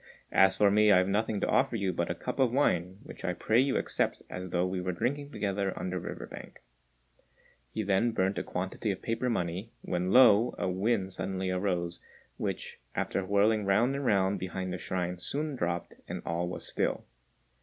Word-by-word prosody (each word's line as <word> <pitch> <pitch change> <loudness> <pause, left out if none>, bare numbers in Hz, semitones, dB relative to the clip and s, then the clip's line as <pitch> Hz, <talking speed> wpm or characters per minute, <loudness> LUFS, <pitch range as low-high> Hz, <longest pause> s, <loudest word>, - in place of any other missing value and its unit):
As 95 0 +5
for 100 -1 +5
me, 105 +1 +5
I - - +7
have 90 0 +3
nothing 105 +1 0
to - - +1
offer 130 -2 +2
you 100 -4 0
but 85 +1 -1
a 85 - -1
cup 125 +10 -5
of 130 -3 +4
wine, 95 -9 +1
which 150 - -11
I 90 - 0
pray 110 +6 +2
you 135 0 +1
accept - - -1
as 90 0 -5
though 90 +1 +1
we 90 0 -2
were 90 0 -2
drinking 140 +9 -2
together 100 -5 -2
on 90 - -3
the 90 - -2
river - - -6
bank." - - -11 1.1
He 110 - -3
then 100 +4 +2
burnt 95 -3 0
a - - -3
quantity 95 +4 -3
of 95 - -3
paper 115 +2 -1
money, 95 +1 -2
when 90 +1 -1
lo! 120 -1 +6
a 90 - -1
wind 95 +1 0
suddenly 95 0 -2
arose, 90 -2 -1 0.4
which, - - -4 0.2
after 95 - -1
whirling 100 +3 +3
round 110 +7 +3
and 140 - -3
round 100 -4 +2
behind 95 0 -4
the 90 - -4
shrine, 90 +1 -3
soon 145 +8 -3
dropped, 85 -6 -2
and - - -5
all 85 +1 -1
was 90 - -5
still. - - -1
95 Hz, 195 wpm, -30 LUFS, 90-110 Hz, 1.1 s, I